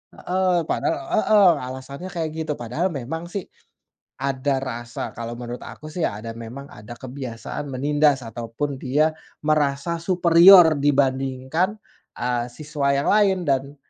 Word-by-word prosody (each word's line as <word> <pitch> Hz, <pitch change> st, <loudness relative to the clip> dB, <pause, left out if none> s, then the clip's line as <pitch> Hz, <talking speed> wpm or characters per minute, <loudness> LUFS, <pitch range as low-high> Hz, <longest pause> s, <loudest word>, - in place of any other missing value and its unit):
Heeh, 185 Hz, +1 st, -1 dB, 0.2 s
padahal -, -, 0 dB, 0.2 s
heeh, 210 Hz, -3 st, +5 dB, 0.2 s
alasannya 140 Hz, +7 st, -8 dB
kayak 165 Hz, -3 st, -2 dB
gitu 160 Hz, -1 st, -2 dB
padahal 125 Hz, +10 st, -1 dB
memang 145 Hz, +5 st, -5 dB
sih 200 Hz, -3 st, -2 dB, 0.8 s
ada 135 Hz, 0 st, 0 dB
rasa, 120 Hz, -2 st, -6 dB, 0.2 s
kalo 115 Hz, 0 st, -5 dB
menurut 120 Hz, 0 st, -6 dB
aku 155 Hz, -, -10 dB
sih 175 Hz, -, -1 dB
ada 105 Hz, +3 st, -7 dB
memang 115 Hz, +4 st, -8 dB
ada 105 Hz, +3 st, -10 dB
kebiasaan 130 Hz, 0 st, -6 dB
menindas 145 Hz, +1 st, +2 dB
ataupun 120 Hz, +5 st, -4 dB
dia 150 Hz, +5 st, +2 dB, 0.3 s
merasa 150 Hz, +1 st, +1 dB
superior 175 Hz, -2 st, +7 dB
dibandingkan, 135 Hz, +6 st, +1 dB, 0.4 s
eee, 120 Hz, -1 st, -1 dB
siswa 145 Hz, -1 st, -1 dB
yang 140 Hz, -, 0 dB
lain. 200 Hz, -2 st, +4 dB
Dan 140 Hz, +1 st, 0 dB
140 Hz, 130 wpm, -23 LUFS, 130-165 Hz, 0.8 s, superior